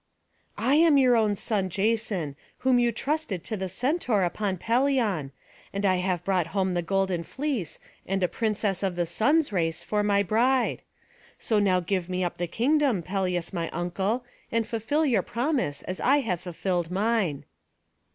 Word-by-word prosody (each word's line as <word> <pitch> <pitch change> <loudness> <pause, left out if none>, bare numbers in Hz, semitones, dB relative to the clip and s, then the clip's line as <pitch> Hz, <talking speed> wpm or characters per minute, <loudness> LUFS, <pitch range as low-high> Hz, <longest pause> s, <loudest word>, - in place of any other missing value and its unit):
"I 265 +5 +3
am 320 -3 +6
your 255 -3 +5
own 215 -3 +2
son 195 -2 -1
Jason, 200 -6 -1 0.2
whom 255 -1 +3
you 240 -1 +3
trusted 255 - -2
to 215 - -3
the 190 -2 -3
Centaur 245 - 0
upon 190 +2 -1
Pelion; 230 - +1 0.4
and 200 +1 -2
I 185 -1 +3
have 180 -1 -1
brought 185 -4 +1
home 190 -1 +1
the 175 - 0
golden 190 0 0
fleece, 260 - -3 0.3
and 195 0 0
a - - +4
princess 210 0 -1
of 190 -3 -1
the 175 0 0
Sun's 285 - +2
race 165 -2 -1
for 210 +4 0
my 200 -1 +2
bride. 245 +6 +2 0.6
So 220 -2 +1
now 185 -3 +3
give 185 0 -2
me 185 0 -1
up 175 - -3
the 175 - -1
kingdom, 255 - +1
Pelias 180 -1 -2
my 170 -2 -2
uncle, 190 +8 -2 0.3
and 230 -1 +1
fulfil 235 +8 0
your 235 -9 +3
promise 240 - -1
as 185 - -4
I 285 +3 +3
have 180 -9 -2
fulfilled 175 -1 -2
mine." 195 -5 0
200 Hz, 170 wpm, -26 LUFS, 180-240 Hz, 0.6 s, am